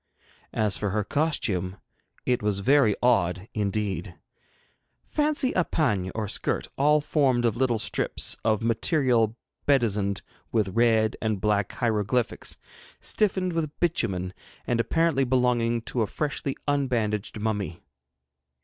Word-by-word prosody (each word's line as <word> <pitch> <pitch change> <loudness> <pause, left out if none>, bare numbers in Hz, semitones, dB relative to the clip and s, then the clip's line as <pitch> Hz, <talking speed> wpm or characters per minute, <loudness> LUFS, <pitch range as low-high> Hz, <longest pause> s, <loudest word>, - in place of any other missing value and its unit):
As 105 -3 +2
for 105 - -1
her 105 +2 0
costume, 100 - -1 0.5
it 125 -1 +1
was 105 -2 0
very 130 -3 +4
odd 95 -5 +2
indeed. 100 -3 -2 0.9
Fancy 295 -3 +1
a 180 - +2
pagne, 105 - 0
or 110 -1 -2
skirt, - - -1
all 150 +2 +4
formed 135 -5 +2
of 115 -3 +2
little 125 -2 +1
strips 110 - 0
of 110 -1 +1
material 115 -1 +2 0.3
bedizened 105 -8 +2 0.3
with 110 -4 +1
red 110 +1 +2
and 110 -3 0
black 105 -1 +1
hieroglyphics, 115 0 -1 0.4
stiffened 190 -4 0
with 155 -3 -3
bitumen, 95 - 0 0.3
and 120 -1 0
apparently 165 +2 +2
belonging 120 -2 +1
to 120 - -2
a 110 - +1
freshly 145 0 -3
unbandaged 115 -8 0
mummy. 105 -5 -3
115 Hz, 120 wpm, -26 LUFS, 105-135 Hz, 0.9 s, very